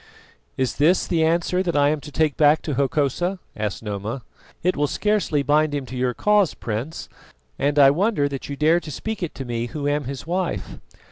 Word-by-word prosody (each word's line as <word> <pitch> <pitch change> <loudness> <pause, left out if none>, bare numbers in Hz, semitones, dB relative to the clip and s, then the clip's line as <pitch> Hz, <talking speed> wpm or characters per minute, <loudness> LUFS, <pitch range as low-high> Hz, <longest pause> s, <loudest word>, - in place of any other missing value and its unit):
"Is 130 -3 -1
this 165 +6 +3
the 165 -3 +1
answer 170 +3 +1
that 170 -5 -1
I 145 0 +4
am 150 -1 -1
to 150 - -10
take 155 -1 +1
back 150 +1 +4
to 150 - -2
Hokosa?" 145 +7 0 0.2
asked 105 0 -3
Noma. 105 +4 -4 0.4
"It 180 +2 +2
will 145 0 +1
scarcely 205 -6 0
bind 150 +1 +2
him 140 -2 -3
to 130 +1 -8
your 125 -1 0
cause, 210 -4 +3
Prince, 120 +8 -4 0.5
and 145 +1 +1
I 135 -1 +8
wonder 180 -2 +1
that 140 -1 -6
you 140 - -3
dare 155 +4 +3
to 170 - -10
speak 220 +8 -5
it 175 - -4
to 135 - -6
me 120 -1 -2
who 145 +4 -4
am 145 -1 0
his 135 +2 -6
wife." 180 0 -3
145 Hz, 205 wpm, -23 LUFS, 135-170 Hz, 0.5 s, I